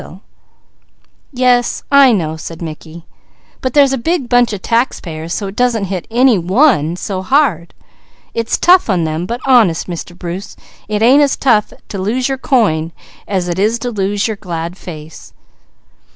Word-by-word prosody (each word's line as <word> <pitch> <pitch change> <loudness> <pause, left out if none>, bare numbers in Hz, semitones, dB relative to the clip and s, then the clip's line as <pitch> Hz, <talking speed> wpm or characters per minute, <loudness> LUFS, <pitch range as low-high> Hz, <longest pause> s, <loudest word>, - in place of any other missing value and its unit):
asked - - -11
Douglas. 185 - -14 1.1
"Yes, 250 -2 +1
I 280 -2 +7
know," 160 -7 -1
said 160 +1 -8
Mickey. 160 0 -9 0.6
"But 260 0 -3
there's 280 -2 +5
a 270 - -1
big 320 0 -1
bunch 245 -1 +3
of 205 -3 -6
taxpayers, 170 -9 -2
so 200 - -2
it 195 +1 -7
doesn't 245 -3 +1
hit 180 -3 -5
any 240 -2 +3
one 180 - +2
so 185 +1 -4
hard. 195 - 0 0.6
It's 230 -1 -1
tough 360 -6 +4
on 180 -4 +1
them, 160 +2 -3
but 235 +4 -4
honest, 225 -11 +3
Mr. 175 0 -7
Bruce, 180 +3 -7 0.3
it 210 0 -1
ain't 265 +5 +6
as 280 -2 +2
tough 220 -6 +2 0.2
to 200 - -5
lose 240 +6 -1
your 270 -1 -3
coin 170 - +1 0.3
as 185 -3 -1
it 175 +1 -3
is 215 +4 +1
to 245 +1 -4
lose 200 0 -1
your 220 -2 -4
glad 170 -2 -5
face. 160 -4 -11
205 Hz, 170 wpm, -15 LUFS, 175-245 Hz, 1.1 s, I